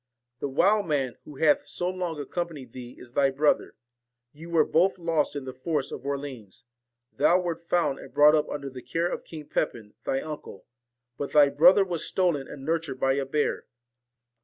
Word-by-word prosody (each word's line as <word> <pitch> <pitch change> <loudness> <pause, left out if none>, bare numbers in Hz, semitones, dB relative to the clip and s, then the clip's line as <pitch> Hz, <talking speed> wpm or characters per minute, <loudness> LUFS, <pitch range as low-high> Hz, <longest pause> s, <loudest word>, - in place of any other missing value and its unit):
The 140 - -2
wild 200 +8 +3
man, 135 -5 -1
who 150 - -11
hath 150 +1 +3
so 175 - -3
long 180 -4 -3
accompanied 145 -4 -5
thee, 125 -1 -9
is 120 -1 -12
thy 135 0 +3
brother. 145 +3 +1 0.6
You 160 +3 -11
were 165 -2 +4
both 180 +5 +2
lost 165 -4 0
in 140 -2 -4
the 130 - -6
forest 145 +2 -2
of - - -7
Orleans. 135 -7 -6 0.5
Thou 180 - +4
wert 170 -1 -4
found 170 -6 +1
and - - -11
brought 150 +1 +6
up 155 -1 +2
under 140 -2 -5
the 130 -1 -9
care 165 +8 -1
of - - -4
King 155 -2 -9
Pepin 110 -6 -3
thy 135 - 0
uncle, 150 -10 -8 0.5
but 140 - -4
thy 145 -2 +7
brother 175 +8 +6
was 170 -3 -3
stolen 170 -8 0
and 135 -2 -9
nurtured 160 -4 -2
by 135 0 +3
a 140 0 -1
bear. 150 +2 -1
150 Hz, 185 wpm, -27 LUFS, 135-170 Hz, 0.6 s, thy